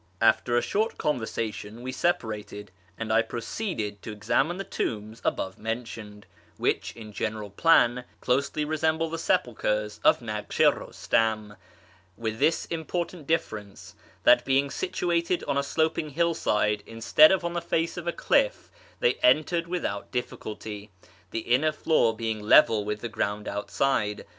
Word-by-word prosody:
After 120 Hz, +2 st, +3 dB
a 120 Hz, -, +2 dB
short 220 Hz, +3 st, -1 dB
conversation 115 Hz, -4 st, -3 dB
we 130 Hz, -, -3 dB
separated, 105 Hz, -, -2 dB, 0.3 s
and 110 Hz, -1 st, -2 dB
I 115 Hz, -, +5 dB
proceeded 115 Hz, -, -4 dB
to 110 Hz, -, -7 dB
examine 120 Hz, -, 0 dB
the 195 Hz, -, -3 dB
tombs 110 Hz, -, -4 dB
above 95 Hz, -1 st, -2 dB
mentioned, 110 Hz, -2 st, -6 dB, 0.3 s
which, -, -, 0 dB
in 110 Hz, -2 st, -10 dB
general 105 Hz, -1 st, -3 dB
plan, 125 Hz, -, +4 dB
closely 140 Hz, +4 st, 0 dB
resemble 160 Hz, +1 st, 0 dB
the 165 Hz, -, -3 dB
sepulchres 105 Hz, -, 0 dB
of -, -, +5 dB
Naksh 105 Hz, -3 st, -5 dB
i -, -, +6 dB
Eustam, 110 Hz, -2 st, -1 dB, 0.6 s
with 110 Hz, -1 st, -3 dB
this 160 Hz, -, +2 dB
important 170 Hz, -1 st, -4 dB
difference, 105 Hz, -11 st, -3 dB, 0.3 s
that -, -, +6 dB
being 135 Hz, +1 st, +1 dB
situated 175 Hz, -1 st, -1 dB
on -, -, -1 dB
a 140 Hz, -, +2 dB
sloping 155 Hz, +2 st, 0 dB
hillside, 145 Hz, -10 st, +1 dB
instead 115 Hz, +8 st, +5 dB
of 190 Hz, -2 st, +1 dB
on 170 Hz, -, -2 dB
the 170 Hz, -, -2 dB
face 165 Hz, 0 st, -1 dB
of 175 Hz, -1 st, -6 dB
a -, -, +2 dB
cliff', -, -, +1 dB, 0.3 s
they 480 Hz, -, +4 dB
are -, -, -19 dB
entered 170 Hz, -, +3 dB
with 180 Hz, 0 st, -2 dB
out 100 Hz, 0 st, -4 dB
difficulty, 105 Hz, -4 st, -5 dB, 0.4 s
the 115 Hz, -, -3 dB
inner 130 Hz, +8 st, +2 dB
floor 150 Hz, -7 st, +2 dB
being 110 Hz, -1 st, -2 dB
level 105 Hz, 0 st, +5 dB
with 105 Hz, 0 st, -4 dB
the 120 Hz, -, -3 dB
ground 105 Hz, -1 st, -3 dB
outside. 105 Hz, +1 st, -1 dB
120 Hz, 150 wpm, -27 LUFS, 105-160 Hz, 0.6 s, i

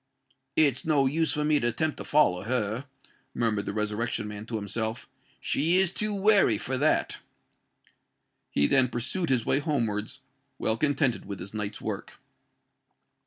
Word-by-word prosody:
"It's 140 Hz, -5 st, +3 dB
no 150 Hz, -4 st, +3 dB
use 160 Hz, +4 st, +1 dB
for 150 Hz, -1 st, -1 dB
me 150 Hz, -1 st, +3 dB
to 120 Hz, -, 0 dB
attempt 150 Hz, +7 st, -1 dB
to -, -, -5 dB
follow 145 Hz, -12 st, +3 dB
her," 115 Hz, +2 st, -2 dB, 0.5 s
murmured 105 Hz, -3 st, 0 dB
the -, -, -1 dB
Resurrection 105 Hz, +1 st, -2 dB
Man 105 Hz, +1 st, -7 dB
to 115 Hz, -, -4 dB
himself: 110 Hz, +2 st, -3 dB, 0.3 s
"she 165 Hz, +5 st, +1 dB
is 190 Hz, -1 st, +2 dB
too 210 Hz, -2 st, -1 dB
wary 195 Hz, -, +4 dB
for 130 Hz, +5 st, -3 dB
that." 145 Hz, +4 st, +1 dB, 1.3 s
He 70 Hz, -, +2 dB
then 130 Hz, -, +4 dB
pursued 130 Hz, +9 st, -2 dB
his 125 Hz, -3 st, +1 dB
way 135 Hz, -, +2 dB
homewards, 115 Hz, -9 st, -2 dB, 0.4 s
well 110 Hz, -, 0 dB
contented 140 Hz, -1 st, +1 dB
with 100 Hz, -1 st, -6 dB
his 95 Hz, +4 st, -8 dB
night's 105 Hz, -2 st, -4 dB
work. -, -, -5 dB
125 Hz, 155 wpm, -27 LUFS, 110-150 Hz, 1.3 s, wary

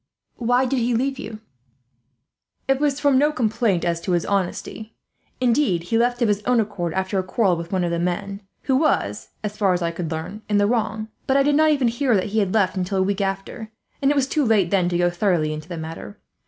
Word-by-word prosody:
"Why 245 Hz, +2 st, +2 dB
did 260 Hz, 0 st, 0 dB
he 240 Hz, 0 st, +1 dB
leave 265 Hz, +3 st, -1 dB
you?" 215 Hz, -4 st, -7 dB, 1.3 s
"It 270 Hz, 0 st, +2 dB
was 290 Hz, -1 st, +1 dB
from 285 Hz, -3 st, +3 dB
no 295 Hz, +2 st, +3 dB
complaint 220 Hz, -, 0 dB
as 170 Hz, -1 st, -1 dB
to 185 Hz, -, -1 dB
his 175 Hz, -, +1 dB
honesty. 200 Hz, +3 st, -3 dB, 0.4 s
Indeed, 240 Hz, -, +2 dB
he 225 Hz, +6 st, 0 dB
left 245 Hz, +1 st, +1 dB
of -, -, +3 dB
his 205 Hz, -1 st, +1 dB
own 245 Hz, +1 st, +2 dB
accord, 195 Hz, -6 st, -2 dB
after 190 Hz, +1 st, 0 dB
a -, -, -1 dB
quarrel 185 Hz, -1 st, +1 dB
with 170 Hz, 0 st, -7 dB
one 185 Hz, -2 st, 0 dB
of 170 Hz, -, -1 dB
the 170 Hz, -, -1 dB
men, 180 Hz, +3 st, -3 dB, 0.2 s
who 265 Hz, -2 st, +2 dB
was, 260 Hz, -, 0 dB
as 210 Hz, 0 st, -4 dB
far 195 Hz, -3 st, +3 dB
as 180 Hz, -1 st, -1 dB
I 170 Hz, -, 0 dB
could 170 Hz, -1 st, -4 dB
learn, 165 Hz, +7 st, -5 dB
in 205 Hz, -, +2 dB
the 205 Hz, -, +4 dB
wrong. 220 Hz, -1 st, -1 dB, 0.2 s
I 275 Hz, +1 st, +4 dB
did 290 Hz, +1 st, +2 dB
not 310 Hz, +2 st, +4 dB
even 280 Hz, -5 st, +2 dB
hear 240 Hz, +1 st, +1 dB
that 195 Hz, +1 st, 0 dB
he 220 Hz, -, +3 dB
had 195 Hz, -3 st, 0 dB
left 200 Hz, -3 st, +2 dB
until 190 Hz, +1 st, -2 dB
a 190 Hz, -, +3 dB
week 200 Hz, +1 st, -1 dB
after, 195 Hz, +3 st, -4 dB, 0.3 s
and 275 Hz, -, +3 dB
it 290 Hz, -, +2 dB
was 275 Hz, -2 st, +2 dB
too 295 Hz, +2 st, 0 dB
late 210 Hz, -8 st, +2 dB
then 185 Hz, -3 st, +2 dB
to 175 Hz, -, 0 dB
go 175 Hz, 0 st, +2 dB
thoroughly 175 Hz, -4 st, +1 dB
into 155 Hz, +2 st, -8 dB
the 170 Hz, -, -5 dB
matter. 165 Hz, +6 st, -7 dB
205 Hz, 235 wpm, -22 LUFS, 180-245 Hz, 1.3 s, the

